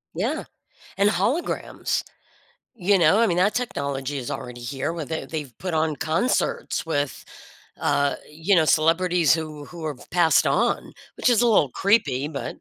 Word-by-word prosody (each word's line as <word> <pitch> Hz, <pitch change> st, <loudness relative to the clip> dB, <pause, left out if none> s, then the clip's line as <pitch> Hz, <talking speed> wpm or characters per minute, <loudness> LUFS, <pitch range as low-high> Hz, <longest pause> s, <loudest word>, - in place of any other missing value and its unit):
Yeah. -, -, -2 dB, 0.5 s
And 200 Hz, +1 st, +4 dB
holograms. 300 Hz, +10 st, -1 dB, 0.7 s
You 195 Hz, -2 st, +2 dB
know, 165 Hz, +6 st, +5 dB
I 230 Hz, -, +5 dB
mean, 175 Hz, -, 0 dB
that 200 Hz, +4 st, +2 dB
technology 140 Hz, -, -3 dB
is 125 Hz, -, -6 dB
already 125 Hz, -1 st, -6 dB
here, 135 Hz, +6 st, -3 dB
where 165 Hz, -3 st, -5 dB
they 160 Hz, +2 st, -4 dB
they've 150 Hz, -7 st, -6 dB
put 185 Hz, -2 st, -4 dB
on 155 Hz, -1 st, +1 dB
concerts 165 Hz, -, -1 dB
with, 145 Hz, -3 st, -2 dB, 0.5 s
uh, 140 Hz, 0 st, +1 dB, 0.2 s
you 165 Hz, +6 st, +1 dB
know, 160 Hz, -, +5 dB
celebrities 165 Hz, +1 st, +3 dB
who 155 Hz, -3 st, -6 dB
who 170 Hz, -2 st, -8 dB
have 145 Hz, -, -8 dB
passed 170 Hz, -2 st, +4 dB
on, -, -, +1 dB, 0.3 s
which -, -, +2 dB
is 240 Hz, -1 st, +4 dB
a -, -, +4 dB
little 180 Hz, -, +4 dB
creepy, 150 Hz, -, +1 dB
but 145 Hz, -3 st, -5 dB
160 Hz, 160 wpm, -24 LUFS, 145-185 Hz, 0.7 s, know